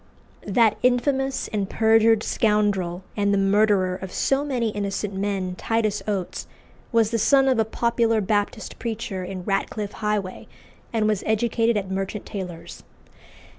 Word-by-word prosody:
That 220 +1 +3
infamous 265 +2 +1
and 205 -3 -2
perjured 225 0 +4
scoundrel, 200 -5 0
and 200 -1 +1
the 200 - +2
murderer 195 -1 +3
of 190 0 -7
so 270 +7 +1
many 250 -6 -1
innocent 205 0 -3
men, 195 -2 -2
Titus 220 -2 0
Oates, 195 -4 -3 0.4
was 230 -2 +3
the 230 - 0
son 270 +5 +4
of 260 -3 +3
a 220 - +3
popular 230 0 +1
Baptist 210 +2 -2
preacher 220 -5 -4
in 185 0 -6
Ratcliffe 200 +1 -2
Highway, 210 -4 -3 0.4
and 220 -2 +1
was 215 -2 +1
educated 230 +1 +1
at 190 -2 -3
Merchant 195 +2 -3
Taylor's. 180 -5 -7
210 Hz, 140 wpm, -24 LUFS, 195-230 Hz, 0.4 s, perjured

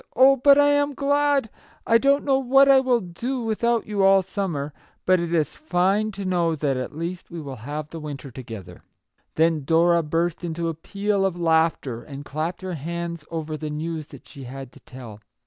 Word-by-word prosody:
" - - -40
Oh, 270 +1 +7
but 280 +2 +5
I 290 0 +5
am 285 0 +1
glad! 285 -2 +2 0.4
I 230 0 +4
don't 280 +3 +2
know 270 -2 +3
what 270 +1 +5
I 270 -1 +7
will 255 -3 +2
do 235 +9 -4
without 230 +1 0
you 210 -2 -2
all 195 0 +5
summer, 170 -7 -3 0.3
but 185 0 +4
it 170 -1 -3
is 155 -3 0
fine 205 - +1
to 195 0 -6
know 175 -3 +1
that 140 -3 -1
at 130 +4 -5
least 170 +2 -5
we 170 - -7
will 140 -4 -7
have 145 +6 -6
the 165 - -7
winter 145 -3 -7
together." 115 -6 -9 0.5
Then 160 -2 +2
Dora 170 +3 +3
burst 165 +3 -1
into 170 0 -2
a - - -2
peal 200 +5 -2
of 185 -2 -1
laughter, 160 -7 +1
and 140 0 -9
clapped 155 +6 -4
her 185 -1 -4
hands 170 +1 -5
over 160 -2 -4
the 155 0 -5
news 155 0 -4
that 140 - -14
she 135 -2 -11
had 135 +1 -8
to - - -17
tell. 120 -5 -11
170 Hz, 200 wpm, -23 LUFS, 150-215 Hz, 0.5 s, Oh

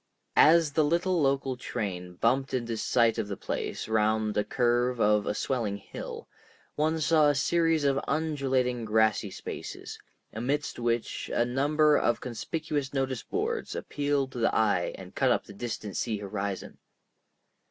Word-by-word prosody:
As 160 0 +6
the 155 +2 +3
little 170 +3 +1
local 135 -1 +1
train 90 -7 -5
bumped 130 +7 +1
into 120 -2 -2
sight 115 0 +2
of 100 - -2
the 100 -2 -5
place - - -4
round 110 0 +1
the 105 - +1
curve 120 +1 +1
of 105 -1 +3
a 105 - 0
swelling 115 -6 -1
hill, 100 - -8 0.5
one 155 +2 0
saw 155 -1 +4
a 145 - +2
series 165 +2 +2
of 140 -1 +2
undulating 135 -5 0
grassy 110 -1 +2
spaces, - - -7 0.3
amidst 135 +7 -2
which 120 -1 -1
a 120 - +2
number 145 +4 +3
of 120 - +1
conspicuous 145 +3 -3
notice 130 -2 -1
boards 445 +3 -3
appealed 145 -2 -1
to 125 - -6
the 115 - +2
eye 105 -5 +2
and - - -11
cut - - +2
up - - +1
the - - -12
distant 110 -2 -5
sea 110 -3 -1
horizon. 100 -1 -5
125 Hz, 155 wpm, -28 LUFS, 110-145 Hz, 0.5 s, As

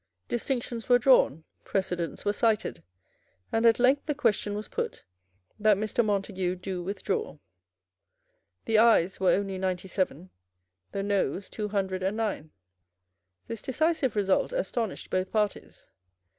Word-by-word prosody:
Distinctions 240 -1 -3
were 245 - +7
drawn; 240 - +4 0.2
precedents 180 -3 -2
were 205 - +2
cited; 220 -1 0 0.7
and 225 +1 +3
at 225 - +5
length 260 +5 +3
the 295 - 0
question 210 -6 +1
was 210 0 -5
put, - - -4 0.6
that 210 -1 +4
Mr. 215 +3 0
Montague 195 -3 -1
do 185 0 -5
withdraw. 205 - -3 1.3
The 220 -1 +3
Ayes 215 -6 +4
were 190 -1 +3
only 195 -1 -1
ninety 185 0 -2
seven; 185 -1 -2 0.6
the 195 - -2
Noes 195 -3 -1
two 210 -1 -4
hundred 190 -2 -1
and 195 +3 -1
nine. 210 -8 -2 1.0
This 230 -2 -6
decisive 300 -2 0
result 195 - +2
astonished 245 - -3
both 185 0 -1
parties. 210 -2 -2
205 Hz, 130 wpm, -28 LUFS, 190-230 Hz, 1.3 s, were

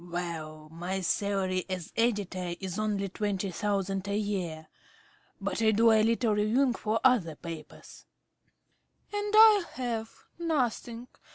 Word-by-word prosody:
~Smith.~ 175 0 -13
Well, 155 -3 -5
my 180 +4 -3
salary 190 0 0
as 185 -3 -5
editor 195 -6 0
is 190 +1 -4
only 205 -2 -1
twenty 195 0 -2
thousand 195 0 -2
a 200 0 0
year, 185 -7 -3 0.7
but - - -2
I 220 - +4
do 225 +2 +5
a 220 -1 +5
little 225 0 +2
reviewing 230 +5 +2
for 225 0 -1
other 210 -12 +3
papers. 165 -1 -10 1.1
~Arabella.~ 410 0 -1
And 420 - 0
I 435 -3 +8
have 230 -3 -3 0.3
nothing. 250 -7 -1
205 Hz, 140 wpm, -29 LUFS, 180-230 Hz, 1.1 s, I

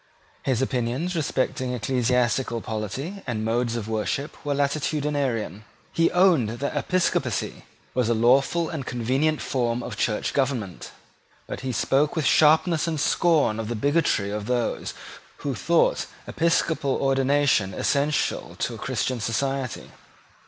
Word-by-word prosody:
His 130 -1 0
opinions 130 +7 -1
respecting 130 -4 -1
ecclesiastical 125 0 +1
polity 115 - -5
and 110 -3 -2
modes 120 +1 0
of 110 -3 -4
worship 110 +7 -2
were 145 -2 -1
latitudinarian. 140 - -1 0.3
He 165 0 +3
owned 175 - +4
that 140 +3 -3
episcopacy 185 -1 -1 0.3
was 125 -3 +1
a 115 - +3
lawful 135 +8 +3
and 155 -5 -4
convenient 130 +6 0
form 120 -2 -1
of - - -6
church 105 -2 0
government; 130 -10 -2 0.6
but - - -6
he 130 -1 -3
spoke 140 +6 +1
with 160 -4 0
sharpness 160 +4 +4
and 160 -2 -1
scorn 150 -8 +2
of 110 - -3
the 120 - -2
bigotry 140 -5 +1
of 105 0 -4
those 120 -2 -1 0.5
who 140 - 0
thought 165 +8 +2 0.2
episcopal 165 -4 +1
ordination 135 -6 +2
essential 145 +1 0
to - - -2
a - - -7
Christian 130 -2 -1
society. 130 +3 -2
135 Hz, 130 wpm, -25 LUFS, 115-150 Hz, 0.6 s, owned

